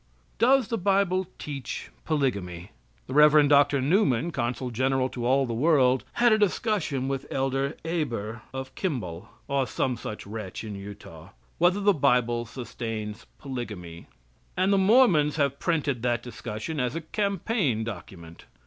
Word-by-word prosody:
Does 255 +1 +4
the 230 - -1
bible 190 -1 +2
teach 140 -4 -6
polygamy? 100 - -2 0.3
The - - -7
Rev. 150 0 +6
Dr. 140 -1 +4
Newman, 165 - +2
consul 125 -2 -2
general 130 +2 +1
to 120 -2 -3
all 135 +1 +3
the 120 - -3
world 130 -1 +3
had 240 0 +4
a 215 - +4
discussion 195 - 0
with 135 0 -3
Elder 135 +2 -1
Heber 120 -10 -3
of 130 0 -6
Kimball, 110 - -4 0.2
or 135 -2 0
some 125 +3 -1
such 105 -2 -7
wretch 105 -2 -6
in 110 -2 -6
Utah 100 -5 -10 0.3
whether 180 +3 +4
the 205 0 +4
bible 125 -5 +2
sustains 115 -3 -6
polygamy, 105 - -7 0.5
and 190 +2 +3
the 195 - +4
Mormons 190 - +4
have 140 -3 0
printed 145 -7 0
that 120 -1 0
discussion 120 +5 -5
as 125 +2 -1
a 165 - -2
campaign 195 - -1
document. 90 -6 -9
135 Hz, 145 wpm, -26 LUFS, 115-165 Hz, 0.5 s, Rev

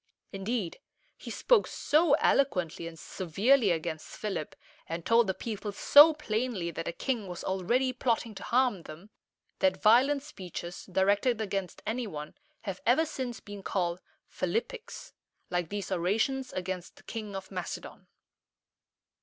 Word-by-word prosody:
Indeed, 195 -2 -3 0.4
he - - -10
spoke - - +3
so 310 0 +3
eloquently 180 - +1
and 165 -1 -9
severely 200 - +2
against 160 -2 -3
Philip, 195 -8 -4 0.3
and 165 0 -4
told 230 -1 +5
the 190 - 0
people 215 -2 -4
so 290 +9 +8
plainly 220 - -2
that 165 - -5
the - - -1
king 230 +1 -2
was 180 -1 -6
already 235 +8 +1
plotting 235 -3 0
to 195 - -9
harm 245 -6 +2
them, 165 +6 -12 0.5
that 285 -1 +3
violent 265 +6 +5
speeches 180 - -7
directed 200 +5 +2
against 195 -3 -3
any 235 +2 -2
one 150 -5 -7 0.3
have 195 -4 -5
ever 260 +8 +4
since 255 -6 -4
been 205 -1 -9
called 180 -2 -1 0.3
"Philippics," 485 +1 -4 0.4
like 175 -2 -1
these 205 -1 -4
orations 220 +9 0
against 185 -1 -4
the - - -18
King 215 -3 -6
of 195 +1 -7
Macedon. 180 -2 -6
205 Hz, 140 wpm, -30 LUFS, 180-250 Hz, 0.5 s, so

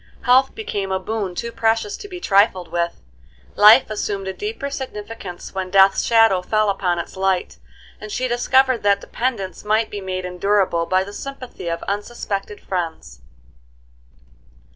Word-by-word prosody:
Health 260 +2 +4
became 205 - -4
a 190 - +1
boon 200 -2 -3
too 235 +5 -4
precious 225 -2 0
to 410 - -9
be 365 -3 -8
trifled 195 - +2
with; 170 - -2 0.5
life 215 +5 +8
assumed 200 -2 -3
a 190 - -3
deeper 415 - -5
significance 210 -8 -7
when 190 -1 -3
death's 195 +1 +5
shadow 225 -5 +4
fell 215 +2 +1
upon 180 -3 -1
its 170 - -6
light, 190 -1 -1 0.4
and 215 - -8
she 255 +4 -1
discovered 255 +1 +2
that 200 -1 +2
dependence 230 -7 -3
might 215 +1 +1
be 205 - -5
made 185 -1 -4
endurable 180 -2 +1
by 185 0 +2
the 200 +1 -10
sympathy 260 -7 -8
of 170 0 -3
unsuspected 205 0 -4
friends. 160 - -5
205 Hz, 150 wpm, -21 LUFS, 185-230 Hz, 0.5 s, life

